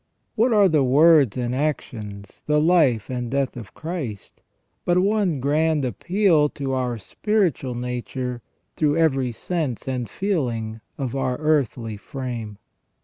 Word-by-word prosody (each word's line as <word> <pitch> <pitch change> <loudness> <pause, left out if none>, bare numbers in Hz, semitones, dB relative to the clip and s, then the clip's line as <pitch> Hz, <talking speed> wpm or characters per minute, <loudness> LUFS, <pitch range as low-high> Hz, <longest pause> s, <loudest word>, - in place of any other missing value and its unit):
What 240 +3 +2
are 205 -3 +6
the 155 -5 +3
words 140 -2 +5
and 125 -1 -1
actions, 110 -8 -4
the 150 0 +3
life 150 - +3
and 125 -2 -3
death 135 0 -1
of 120 -3 -10
Christ, 155 - -6 0.4
but 175 0 +2
one 195 -5 +2
grand 150 +2 +1
appeal 165 - +2
to 135 -2 -4
our 125 -2 -1
spiritual 165 - -1
nature 125 0 -4 0.3
through 150 0 +2
every 135 -6 +2
sense 145 -1 -3
and 125 -4 -2
feeling 115 - -2 0.2
of 135 -3 -3
our 130 -2 -1
earthly 130 -8 0
frame 115 -3 -6
135 Hz, 135 wpm, -23 LUFS, 120-160 Hz, 0.4 s, are